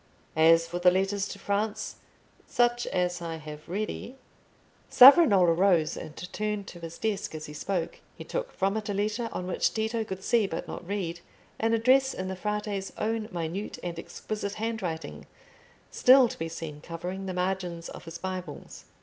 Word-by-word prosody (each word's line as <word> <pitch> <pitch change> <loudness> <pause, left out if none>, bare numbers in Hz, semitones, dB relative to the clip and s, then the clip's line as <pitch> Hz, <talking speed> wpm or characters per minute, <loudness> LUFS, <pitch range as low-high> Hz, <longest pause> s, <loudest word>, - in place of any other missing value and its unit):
As 165 +1 +6
for 175 +1 -4
the 180 0 +6
letters 195 +2 0
to - - -7
France, 205 +2 -2 0.5
such 240 0 +2
as 180 -1 -1
I 165 -1 -4
have 150 0 -10
ready—" 215 +6 -4 0.7
Savonarola 245 - +8
rose 170 -3 +3
and 155 - -8 0.2
turned 210 -1 -2
to 175 - -11
his 165 0 -8
desk 210 -6 -2
as 155 - -6
he 150 - -9
spoke. 175 +1 -3 0.2
He - - -8
took - - -4
from 195 +2 0
it 215 -1 -4
a 200 - -1
letter 215 +3 -1
on 180 - -4
which 180 - +1
Tito 220 +1 0
could 190 -2 -7
see, 225 -2 +3
but 165 - -5
not 175 - -7
read, 180 -4 -3 0.4
an 225 +1 +2
address 265 +4 +4
in 185 0 -4
the 190 - -3
Frate's 210 0 -3
own 220 0 -1
minute 175 +3 -4
and 170 -2 -4
exquisite 200 +3 -5
handwriting, 175 - -4 0.6
still 255 0 +7
to - - -8
be 165 0 -3
seen 155 -2 -7
covering 180 +4 -5
the 185 - -3
margins 180 -2 -2
of - - -10
his 165 +1 -7
Bibles. 185 -1 -7
190 Hz, 175 wpm, -28 LUFS, 170-215 Hz, 0.7 s, Savonarola